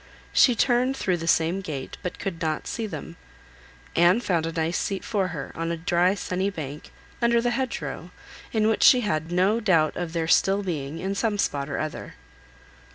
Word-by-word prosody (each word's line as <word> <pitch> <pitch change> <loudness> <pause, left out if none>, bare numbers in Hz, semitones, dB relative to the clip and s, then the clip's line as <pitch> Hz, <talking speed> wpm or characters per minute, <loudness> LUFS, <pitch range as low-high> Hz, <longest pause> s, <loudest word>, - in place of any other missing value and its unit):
She 245 - +5
turned 250 +3 +2
through 185 -7 0
the 165 0 -6
same 165 +3 +2
gate, 145 -7 -6
but 180 - -5
could 170 -4 -5
not 155 -1 -1
see 225 -2 -3
them. 170 -4 -8 0.8
Anne 175 +6 +5
found 170 -8 0
a - - -3
nice 165 +1 -1
seat 195 -1 -2
for 195 -3 0
her, 150 -6 -6
on 165 0 -3
a 170 - -2
dry 175 +2 +2
sunny 190 0 -2
bank, 150 -6 -7 0.3
under 235 0 +4
the 240 +1 0
hedge 260 0 -2
row, 150 +4 -6 0.4
in 215 -1 +2
which 220 - +1
she 250 - +7
had 165 -7 -2
no 190 +6 +2
doubt 165 -8 +2
of 170 -2 -4
their 165 -1 -1
still 195 +4 +3
being, 155 -5 -4
in 190 +3 -2
some 210 +1 0
spot 140 -7 -1
or - - -3
other. 155 0 -5
180 Hz, 195 wpm, -25 LUFS, 160-210 Hz, 0.8 s, she